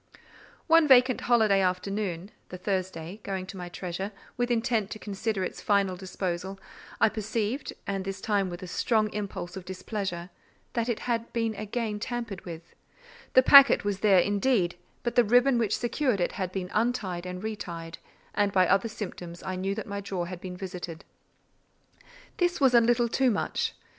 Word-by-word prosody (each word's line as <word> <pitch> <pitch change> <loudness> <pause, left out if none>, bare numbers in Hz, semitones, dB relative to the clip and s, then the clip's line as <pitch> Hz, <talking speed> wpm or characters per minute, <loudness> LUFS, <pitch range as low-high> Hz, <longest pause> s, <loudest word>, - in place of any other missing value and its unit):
One 330 -2 +5
vacant 255 -2 +6
holiday 220 -5 +4
afternoon 185 0 -2 0.2
(the 180 - -7
Thursday) 185 -1 -3
going 190 -2 -4
to 185 - -9
my 180 -1 -6
treasure, 185 +3 -5 0.2
with 245 0 -1
intent 230 -3 +1
to - - -6
consider 205 -1 -2
its - - -5
final 200 -3 +2
disposal, 190 0 -4 0.4
I - - +6
perceived—and 215 -2 -3
this 195 0 -5
time 200 -2 0
with 175 +1 -7
a - - -6
strong 215 +3 +1
impulse 200 -4 -5
of 190 - -6
displeasure—that 190 +4 -5
it 235 - -1
had 235 -1 -2
been 230 -1 0
again 215 +1 -3
tampered 225 -4 -5
with: 165 -1 -9 0.6
the 260 - +7
packet 275 -5 +8
was 200 -2 -1
there, 200 -3 +5
indeed, 200 0 +2 0.3
but 240 - -1
the 245 0 +5
ribbon 245 +3 +4
which 220 -3 +1
secured 245 -2 0
it 175 - +1
had 185 -2 -3
been 185 -1 -4
untied 210 -6 -1
and 180 +1 -6
retied; 170 -6 -6 0.3
and 205 -1 +2
by 185 -1 +4
other 195 +5 +2
symptoms 180 -5 -7
I 185 - -3
knew 195 +2 -2
that 220 - -5
my 200 0 -4
drawer 190 -3 -3
had 180 0 -7
been 180 -1 -7
visited. 180 -3 -7 1.3
This 350 -1 +1
was 265 -3 +4
a 235 - +7
little 240 +1 +3
too 260 +2 +2
much. 210 - -1
200 Hz, 170 wpm, -28 LUFS, 185-230 Hz, 1.3 s, packet